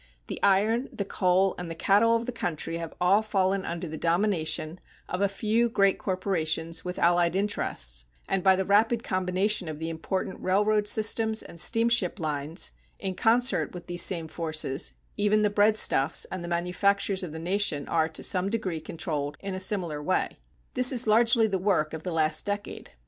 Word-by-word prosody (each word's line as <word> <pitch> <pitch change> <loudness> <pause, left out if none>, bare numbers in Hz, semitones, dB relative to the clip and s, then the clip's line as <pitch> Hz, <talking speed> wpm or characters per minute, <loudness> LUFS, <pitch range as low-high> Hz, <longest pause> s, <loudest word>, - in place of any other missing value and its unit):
The - - -7
iron, 215 +6 +2
the 200 - -4
coal, 185 0 +1
and 175 -1 -6
the 165 - -6
cattle 210 +7 +3
of 230 0 -1
the 250 - -3
country 165 -7 -3
have 165 -1 -7
all 185 +4 +4
fallen 195 -2 0
under 170 0 -5
the 160 0 -7
domination 170 -2 0 0.3
of 180 - -4
a 200 - +2
few 220 +4 0
great 195 -3 +2
corporations 165 -4 -1
with 180 0 -5
allied 175 0 +2
interests, 60 - 0 0.2
and 195 -1 0
by 190 -1 +5
the 190 0 -1
rapid 225 +4 +2
combination 185 0 0
of 155 -1 -5
the 160 +1 -4
important 185 +4 -4
railroad 210 +2 +1
systems 220 +1 +1
and 170 - -11
steamship 230 0 +2
lines, 155 +1 -3 0.3
in 190 -1 -4
concert 215 - +1
with 175 - -8
these 175 -1 +1
same 170 -3 +2
forces, 155 -4 -1 0.2
even 210 +1 +2
the 210 - +2
breadstuffs 205 -9 +3
and 185 -2 -5
the - - -6
manufactures 190 +3 0
of 180 -4 -5
the 160 - -7
nation 175 -3 -1
are 160 -1 +1
to 160 - -5
some 185 +1 +1
degree 190 -7 -3
controlled 150 -3 -4
in 195 -1 -5
a 185 - -4
similar 180 -6 -2
way. 185 +5 0 0.4
This 250 0 +5
is 250 -2 +3
largely 230 +1 +4
the 195 -3 -1
work 180 -6 0
of 160 - -5
the 180 - -5
last 155 -1 +1
decade. 205 0 -5
185 Hz, 180 wpm, -27 LUFS, 165-210 Hz, 0.4 s, by